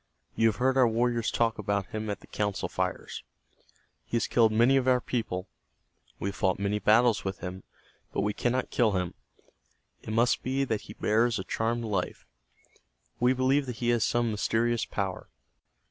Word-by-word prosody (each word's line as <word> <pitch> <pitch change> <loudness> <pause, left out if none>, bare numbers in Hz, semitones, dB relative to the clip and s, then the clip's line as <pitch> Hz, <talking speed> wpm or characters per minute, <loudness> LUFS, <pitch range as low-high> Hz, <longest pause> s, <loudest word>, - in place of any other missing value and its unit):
You 115 - +4
have 110 - +1
heard 130 +3 +1
our 130 -2 +6
warriors 115 0 +1
talk 115 -1 0
about 100 -1 -1
him 110 0 -4
at 100 - -4
the - - -14
council 105 -2 -2
fires. - - -3 0.8
He - - -5
has - - 0
killed 115 -2 +3
many 120 +5 +4
of 130 -1 +2
our 125 -1 +4
people. 110 -7 -3 0.7
We 100 - -2
have 100 - -7
fought 95 -3 +1
many 100 +1 -1
battles 110 +3 +4
with 95 -1 -4
him, 90 +1 -6 0.5
but - - -1
we 105 +1 0
cannot 125 +3 -1
kill 110 -4 +2
him. 90 -2 -1 0.9
It - - -10
must 115 +3 +2
be 135 +2 0
that 110 -6 -1
he 105 - -11
bears 115 +2 +1
a 95 - -3
charmed 115 +4 -1
life. 100 -5 -3 0.9
We 125 +1 +4
believe 130 +2 +2
that 125 - -4
he 120 - -1
has 120 -2 +3
some 120 -1 +1
mysterious 115 +2 0
power. 95 -2 -4
115 Hz, 180 wpm, -28 LUFS, 105-120 Hz, 0.9 s, our